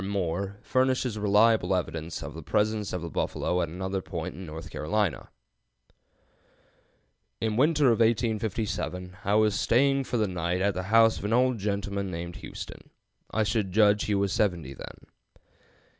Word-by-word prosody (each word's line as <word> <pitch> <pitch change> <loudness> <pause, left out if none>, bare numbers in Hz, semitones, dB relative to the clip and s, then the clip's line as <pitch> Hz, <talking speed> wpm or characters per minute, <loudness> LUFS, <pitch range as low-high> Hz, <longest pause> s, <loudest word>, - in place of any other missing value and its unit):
Moore, 100 0 -2
furnishes 130 -3 +1
reliable 105 -2 +4
evidence 80 -2 -4
of - - -7
the 80 - -8
presence 105 +4 0
of 90 -2 -4
the 85 - -4
buffalo 90 0 -1
at 85 - -1
another 95 +3 -3
point - - -5
in 90 +3 -9
North 80 +2 -8
Carolina: 90 +2 -1 2.1
"In 110 - 0
the 105 - -1
winter 150 +1 +4
of 115 - +1
1857 110 -5 -1
I 100 +2 +1
was 110 -1 +4
staying 135 +6 +2
for 125 - -2
the 110 -2 +1
night 90 -1 -2
at 100 +1 +1
the 95 - -3
house 115 0 +5
of - - -6
an 105 - 0
old 125 -1 +3
gentleman 100 -1 -2
named 85 0 -6
Houston. - - -9 0.4
I 110 - +1
should 105 -2 -1
judge 105 +1 +4
he 105 - 0
was 100 -1 +1
seventy 90 -10 0
then. - - -11
100 Hz, 160 wpm, -27 LUFS, 90-110 Hz, 2.1 s, house